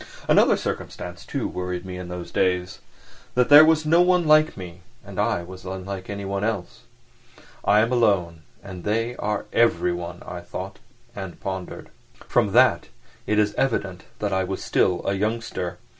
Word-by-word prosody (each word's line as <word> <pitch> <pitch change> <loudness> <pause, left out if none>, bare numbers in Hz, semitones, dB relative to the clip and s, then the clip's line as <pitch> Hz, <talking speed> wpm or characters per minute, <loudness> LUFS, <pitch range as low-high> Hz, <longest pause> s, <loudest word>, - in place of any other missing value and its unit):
Another - - +5
circumstance, - - -6
too, - - -2
worried 90 0 -4
me 90 -1 -6
in 90 0 -7
those 90 -1 -7
days: 90 -1 0 0.6
that 125 0 +3
there 145 +1 +10
was 155 -1 +3
no 165 +3 +5
one 180 -1 +3
like 155 -2 +4
me 90 -1 -9 0.2
and - - -7
I 85 - +1
was 95 +1 -11
unlike 95 +1 -6
anyone 100 -1 -3
else. 105 -5 -3 0.8
"I 105 +1 +4
am 115 +2 +1
alone 95 -9 +1 0.2
and 90 -2 -9
they 115 +3 -1
are 105 -1 -2
everyone," 90 -6 +1
I 90 - -6
thought—and 95 +1 -9
pondered. 95 -2 -6 0.4
From - - +2
that - - +4 0.4
it 105 - +1
is 105 -1 +2
evident 100 -8 -1
that 105 -2 -2
I 95 0 +1
was 95 +1 -4
still 90 -2 +1
a 100 - +1
youngster. 105 -3 -3
95 Hz, 160 wpm, -24 LUFS, 90-115 Hz, 0.8 s, there